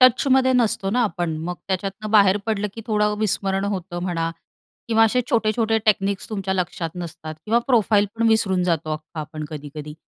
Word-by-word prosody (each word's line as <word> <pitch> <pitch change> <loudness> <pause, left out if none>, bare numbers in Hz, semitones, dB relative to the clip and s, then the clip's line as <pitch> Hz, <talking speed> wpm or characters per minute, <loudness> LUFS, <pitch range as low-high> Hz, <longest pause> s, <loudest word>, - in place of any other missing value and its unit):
टचमध्ये 260 +1 +5
नसतो 220 -5 +2
ना 245 +2 +2
आपण 175 -7 -1
मग 180 +1 -3
त्याच्यातनं 195 +3 -3
बाहेर 200 -3 +5
पडलं 210 -2 0
की 225 - -7
थोडं 210 -2 +1
विस्मरण 195 -2 0
होतं 185 -3 -3
म्हणा 165 -2 -1 0.6
किंवा 225 -1 +5
असे 235 +3 +2
छोटे-छोटे 225 0 +2
टेक्निक्स 200 -1 +1
तुमच्या 195 -2 -2
लक्षात 175 -3 -2
नसतात 160 -3 -7
किंवा 230 +2 +3
प्रोफाईल 215 -5 +3
पण 230 0 +2
विसरून 190 -5 +2
जातो 165 -3 0
अख्खा 155 +1 -6
आपण 155 0 -6
कधी-कधी. 150 0 -7
195 Hz, 165 wpm, -22 LUFS, 175-220 Hz, 0.6 s, टचमध्ये